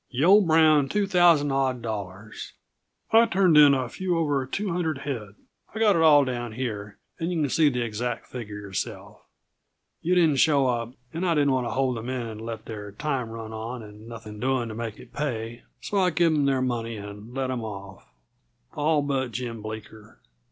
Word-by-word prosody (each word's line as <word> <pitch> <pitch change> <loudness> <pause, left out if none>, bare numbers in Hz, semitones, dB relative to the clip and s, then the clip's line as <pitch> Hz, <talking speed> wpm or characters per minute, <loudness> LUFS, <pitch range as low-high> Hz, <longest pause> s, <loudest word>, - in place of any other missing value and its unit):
"Yuh 135 +4 0
owe 200 +4 +7
Brown 155 -5 +4
two 205 +4 +1
thousand 175 -7 +4
odd 135 -2 0
dollars. 105 -1 -6 0.6
I 230 +1 +6
turned 185 -4 +3
in 145 -2 +8
a 130 -2 -1
few 180 +6 -2
over 145 -5 0
two 195 +6 -2
hundred 165 -4 -1
head 120 -8 -5 0.4
I've - - -3
got 210 -3 +4
it 165 - +2
all 145 -3 +6
down 120 -3 -4
here, 105 -4 -5 0.2
and 165 +1 -2
yuh 170 - -1
can 145 - 0
see 155 -2 +4
the 125 -3 -1
exact 115 +1 -3
figure 110 -5 -7
yourself. 100 -3 -6 0.8
Yuh 180 +2 +1
didn't 160 -5 +4
show 140 -1 +4
up, 120 -1 -1 0.2
and 165 +3 -3
I 175 -3 +2
didn't 145 -2 +3
want 130 -2 0
to - - -3
hold 130 -2 0
the - - -5
men 125 +1 -3
and 110 -1 -7
let 115 0 -6
their 105 -2 -7
time 130 0 -2
run 115 -1 -7
on 115 +2 -6
and 105 +1 -13
nothing 110 -2 -9
doing 130 -1 0
to - - -6
make 115 -1 -5
it - - -15
pay, 120 -5 -4 0.2
so 205 - -1
I 185 -1 +4
give 170 -1 +2
'em 145 -2 +2
their 135 -2 +2
money 115 -3 -2
and 105 +4 -9
let 130 -1 -1
'em 125 -3 -3
off 100 -2 -9 0.6
all 150 0 +1
but 135 -3 -1
Jim 115 -1 -5
Bleeker. 110 0 -9
130 Hz, 200 wpm, -26 LUFS, 110-150 Hz, 0.8 s, in